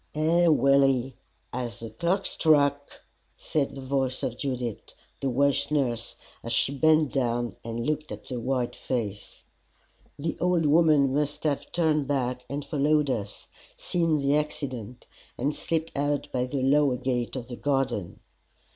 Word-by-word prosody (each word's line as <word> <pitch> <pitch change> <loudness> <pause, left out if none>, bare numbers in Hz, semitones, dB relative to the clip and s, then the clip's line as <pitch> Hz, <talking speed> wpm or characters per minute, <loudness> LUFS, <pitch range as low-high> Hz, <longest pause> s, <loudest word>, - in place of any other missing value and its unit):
"Ay, 165 +3 +3
Willie, 135 -4 +3 0.4
as 120 -4 -4
the 115 -1 -7
clock 170 - 0
struck!" 145 -2 +2 0.3
said 145 -3 -1
the 135 - -7
voice 130 -1 -1
of 120 - -1
Judith, 125 -5 -4 0.2
the 135 - -1
Welsh 140 +2 +2
nurse, 125 -6 -1 0.3
as 115 - -5
she 125 +4 +2
bent 155 0 +3
down 120 -4 0
and 115 +1 -4
looked 155 +1 -2
at - - -8
the 125 -2 -4
white 125 0 -1
face. 105 -6 -4 0.7
The 160 +3 -2
old 180 -2 +2
woman 150 -3 +4
must 150 +1 -1
have 145 -3 -1
turned 155 -4 +1
back 125 -3 -1
and 140 +1 -4
followed 150 -1 +2
us, 105 -5 -4 0.3
seen 165 -3 +1
the 140 0 +2
accident, 130 -6 -4 0.3
and 140 +5 0
slipped 165 +1 -2
out 145 0 -1
by 125 -1 0
the 130 0 -2
lower 140 -1 +3
gate 125 -1 -2
of 125 -3 -4
the 120 0 -7
garden. 135 -9 -1
140 Hz, 150 wpm, -27 LUFS, 125-150 Hz, 0.7 s, woman